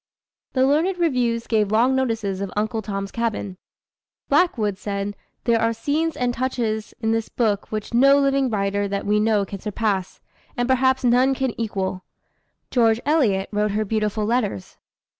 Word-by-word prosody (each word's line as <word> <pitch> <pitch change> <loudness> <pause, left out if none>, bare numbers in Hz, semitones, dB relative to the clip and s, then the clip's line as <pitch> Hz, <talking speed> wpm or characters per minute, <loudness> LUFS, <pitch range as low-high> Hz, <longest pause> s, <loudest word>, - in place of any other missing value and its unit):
The 260 0 +3
learned 320 +7 +2
reviews 250 -8 0
gave 215 -3 +1
long 235 +4 +3
notices 225 -7 -1
of 200 -2 -4
Uncle 220 +1 -1
Tom's 195 -1 -4
Cabin. 215 -5 -3 0.7
Blackwood 215 - +2
said, 200 0 -3 0.3
"There 230 -2 +2
are 230 0 +2
scenes 300 +8 -1
and 245 -1 0
touches 235 -4 -2
in 225 -1 +1
this 225 0 -1
book 210 -4 -1
which 215 +1 -4
no 275 +4 +6
living 275 -1 +2
writer 200 -1 0
that 200 0 -3
we 210 +1 +2
know 210 -2 +2
can 200 0 -7
surpass, 205 -2 -2 0.4
and 245 0 0
perhaps 260 0 +2
none 250 +2 +3
can 265 -2 -1
equal." 190 -4 -3 0.7
George 225 -3 +3
Eliot 240 -11 +2
wrote 210 -1 0
her 215 +1 0
beautiful 215 0 -1
letters. 215 - -2
225 Hz, 160 wpm, -22 LUFS, 205-255 Hz, 0.7 s, no